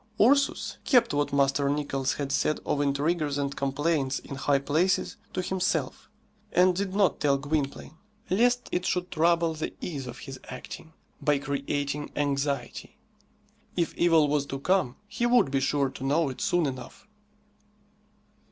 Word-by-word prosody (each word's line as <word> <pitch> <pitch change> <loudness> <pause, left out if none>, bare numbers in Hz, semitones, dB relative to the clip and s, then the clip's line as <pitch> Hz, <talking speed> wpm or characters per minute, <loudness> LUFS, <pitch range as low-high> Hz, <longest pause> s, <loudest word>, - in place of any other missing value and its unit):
Ursus 280 +5 +3
kept 245 - +4
what 145 0 0
Master 140 0 +2
Nicless 140 -2 -1
had 140 -2 -3
said 155 - +1
of 145 - 0
intriguers 145 +1 0
and 140 -1 -2
complaints 140 0 0
in - - -9
high 140 +1 +1
places 155 +7 +1 0.2
to 185 - -2
himself, 180 -7 -2 0.4
and 180 0 +4
did 195 0 -2
not 200 -2 +2
tell 140 -2 +3
Gwynplaine, 145 +1 -3 0.3
lest 245 +6 +2
it 180 - 0
should 180 0 -1
trouble 170 0 +2
the 155 0 -5
ease 140 -7 -5
of 120 +1 -7
his 135 -2 -9
acting 145 +5 -9 0.3
by 150 -1 +2
creating 140 +1 -3
anxiety. 140 -1 -2 0.8
If 170 -2 0
evil 165 -3 +4
was 145 -1 0
to 135 - -4
come, 160 -3 +1
he 240 +3 -1
would 240 - +4
be 135 - +2
sure 140 0 +1
to 130 - -9
know 145 +2 +2
it 130 - -7
soon 175 -2 +2
enough. 130 -3 -6
145 Hz, 150 wpm, -27 LUFS, 140-175 Hz, 0.8 s, kept